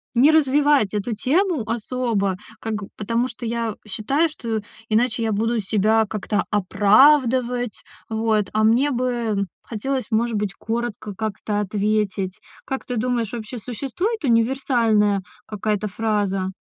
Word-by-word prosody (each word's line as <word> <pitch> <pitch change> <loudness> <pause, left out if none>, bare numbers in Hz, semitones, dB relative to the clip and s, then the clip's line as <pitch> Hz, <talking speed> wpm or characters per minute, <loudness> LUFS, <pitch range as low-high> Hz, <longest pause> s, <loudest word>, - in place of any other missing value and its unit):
не 275 +6 +6
развивать 285 -7 +3
эту 210 +3 -1
тему 310 - +1
особо, 225 -5 -1 0.2
как, 225 -1 -4
г 210 -1 -5
потому 230 +4 0
что 240 -1 -8
я 230 -2 -2
считаю, 275 - +1
что 225 -7 -3 0.3
иначе 225 +1 +2
я 220 - 0
буду 225 +3 0
себя 215 +2 +2
как-то 210 0 -1
оправдывать. 245 +4 +3 0.3
Вот, 220 -2 +1
а 215 0 +2
мне 235 +6 +4
бы 235 -5 0 0.2
хотелось, 260 +4 -3
может 230 +1 +1
быть, 205 -2 -1
коротко 225 -2 -4
как-то 210 0 -3
ответить. 205 -1 -1 0.3
Как 265 - -4
ты 245 -2 -3
думаешь, 240 -2 -1
вообще 235 +1 -5
существует 280 - -3
универсальная 230 -4 +2 0.3
какая-то 210 0 -1
фраза? 205 -3 -1
225 Hz, 130 wpm, -22 LUFS, 210-250 Hz, 0.3 s, не